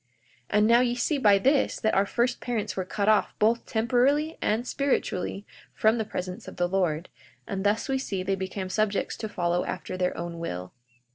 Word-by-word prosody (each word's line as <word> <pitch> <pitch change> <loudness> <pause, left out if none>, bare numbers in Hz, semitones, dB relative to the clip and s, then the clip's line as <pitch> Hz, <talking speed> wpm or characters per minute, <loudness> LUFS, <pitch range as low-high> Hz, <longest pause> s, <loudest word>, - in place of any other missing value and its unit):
42:7 125 - -44 0.5
And 210 - +5
now, 235 +1 +6
ye 245 -1 +2
see 275 +4 0
by 205 -6 +6
this 270 +7 +2
that 220 - +1
our 195 +1 +3
first 240 +4 0
parents 235 -4 -2
were 190 - -1
cut 200 +2 -2
off 215 -1 +3
both 230 +2 +2
temporally 265 +8 +2
and 230 +4 0
spiritually 205 -8 -1 0.3
from 220 +2 +3
the 220 - -1
presence 180 -3 -5
of - - -8
the 175 - +1
Lord; 175 -3 0 0.4
and 195 -1 -3
thus 210 +5 +1
we 265 -1 0
see 195 -8 -3
they 195 +1 0
became 190 0 -4
subjects 210 +1 0
to 220 - -5
follow 175 -2 0
after 185 0 -5
their 180 0 -1
own 170 0 -5
will. 90 - -5
210 Hz, 200 wpm, -27 LUFS, 185-240 Hz, 0.5 s, now